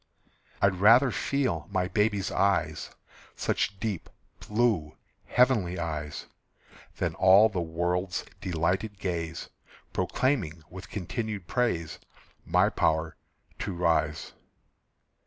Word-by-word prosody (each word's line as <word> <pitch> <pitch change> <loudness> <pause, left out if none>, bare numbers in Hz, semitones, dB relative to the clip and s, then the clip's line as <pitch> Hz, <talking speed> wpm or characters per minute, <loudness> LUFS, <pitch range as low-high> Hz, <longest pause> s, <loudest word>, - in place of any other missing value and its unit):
I'd 95 -2 +3
rather 120 +5 +7
feel 120 - -1
my 95 -2 0
baby's 105 0 0
eyes, 80 -6 +1 0.5
Such 100 - -1
deep 100 -5 -3 0.3
blue 105 -9 0 0.3
heavenly 110 -8 +3
eyes, 75 -3 -4 0.7
Than - - -1
all 95 +4 +6
the 95 -5 -2
world's 90 +3 -2
delighted 95 +5 -1
gaze, 85 -4 -4 0.4
Proclaiming 95 - 0
with 95 +2 -9
continued 105 0 -4
praise 85 -7 -1 0.5
My - - +4
power 80 -1 +1 0.4
to 95 - -3
rise. 80 -2 0
95 Hz, 100 wpm, -28 LUFS, 80-105 Hz, 0.7 s, rather